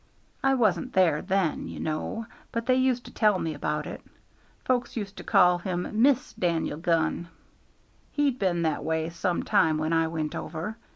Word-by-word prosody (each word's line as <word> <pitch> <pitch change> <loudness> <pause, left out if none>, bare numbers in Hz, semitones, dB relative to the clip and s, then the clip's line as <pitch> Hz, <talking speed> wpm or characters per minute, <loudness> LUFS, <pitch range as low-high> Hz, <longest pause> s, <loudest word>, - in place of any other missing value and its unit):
I 270 0 +4
wasn't 220 -1 +1
there 170 -6 +3
then, 190 -4 0
you - - -7
know, 160 +8 -3 0.3
but 230 0 -2
they 255 - +4
used 255 -1 +1
to - - -10
tell 210 -3 +3
me 165 -3 -2
about 150 +1 -2
it. - - -7 0.6
Folks 250 -1 0
used 200 -2 -4
to - - -7
call 180 0 +4
him 180 -1 -2
Miss 265 0 +3
Dan'el 165 -3 -1
Gunn. 170 0 +1 0.8
"He'd 285 -4 +1
been 175 -3 +1
that 155 -3 0
way 160 +1 -1
some 175 +1 -1
time 155 -1 +3
when 155 +1 -1
I 165 0 +3
went 160 -2 -3
over. 165 +7 -5
175 Hz, 175 wpm, -27 LUFS, 160-225 Hz, 0.8 s, I